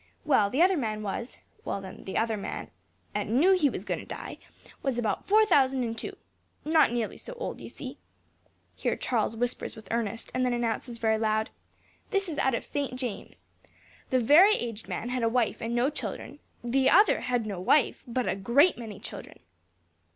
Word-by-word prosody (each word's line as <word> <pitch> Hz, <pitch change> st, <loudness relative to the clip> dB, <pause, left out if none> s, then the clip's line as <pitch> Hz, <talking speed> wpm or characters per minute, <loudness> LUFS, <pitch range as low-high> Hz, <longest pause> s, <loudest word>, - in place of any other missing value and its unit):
Well, 210 Hz, -9 st, +4 dB
the 275 Hz, +10 st, +3 dB
other 370 Hz, 0 st, +4 dB
man 215 Hz, -5 st, -2 dB
was 220 Hz, +4 st, -4 dB, 0.3 s
well, -, -, -3 dB
then, 190 Hz, -1 st, -10 dB
the 190 Hz, -, -3 dB
other 225 Hz, -1 st, +1 dB
man 200 Hz, -, -6 dB, 0.4 s
'at 210 Hz, 0 st, -2 dB
knew 275 Hz, -, +4 dB
he 325 Hz, -6 st, +3 dB
was -, -, -6 dB
going -, -, -2 dB
to -, -, -9 dB
die, -, -, -7 dB, 0.4 s
was 270 Hz, -3 st, -1 dB
about 225 Hz, -3 st, -1 dB
four 435 Hz, +2 st, +6 dB
thousand 265 Hz, -8 st, +3 dB
and 230 Hz, -1 st, -2 dB
two; 225 Hz, -, -6 dB, 0.5 s
not 315 Hz, -4 st, +4 dB
nearly 235 Hz, -2 st, -2 dB
so -, -, -9 dB
old, -, -, -5 dB
you -, -, -8 dB
see." -, -, -8 dB, 0.8 s
(Here -, -, -1 dB
Charles 225 Hz, -2 st, -1 dB
whispers 245 Hz, +1 st, -2 dB
with 220 Hz, -3 st, -12 dB
Ernest, 230 Hz, -1 st, -2 dB
and 255 Hz, -, 0 dB
then 250 Hz, -1 st, +1 dB
announces 235 Hz, 0 st, -2 dB
very 220 Hz, -1 st, +1 dB
loud), 220 Hz, 0 st, 0 dB, 0.6 s
"This 395 Hz, -2 st, 0 dB
is 315 Hz, -4 st, -3 dB
out 265 Hz, -2 st, +2 dB
of -, -, -4 dB
St. 280 Hz, -3 st, -3 dB
James. 250 Hz, -5 st, -6 dB, 0.6 s
The 255 Hz, -, +3 dB
very 335 Hz, -, +7 dB
aged 230 Hz, -2 st, -5 dB
man 240 Hz, -, -3 dB
had 250 Hz, 0 st, -1 dB
a 230 Hz, -, +2 dB
wife 235 Hz, -1 st, 0 dB
and 230 Hz, +1 st, -2 dB
no 250 Hz, +4 st, +2 dB
children; -, -, -6 dB, 0.2 s
and 240 Hz, 0 st, -4 dB
the 270 Hz, 0 st, +4 dB
other 405 Hz, +7 st, +5 dB
had 245 Hz, -3 st, 0 dB
no 200 Hz, -4 st, -4 dB
wife, 265 Hz, +8 st, +3 dB
but 245 Hz, +1 st, -1 dB
a -, -, +1 dB
great 245 Hz, -, +3 dB
many 220 Hz, -4 st, -7 dB
children. -, -, -9 dB
240 Hz, 195 wpm, -28 LUFS, 225-275 Hz, 0.8 s, very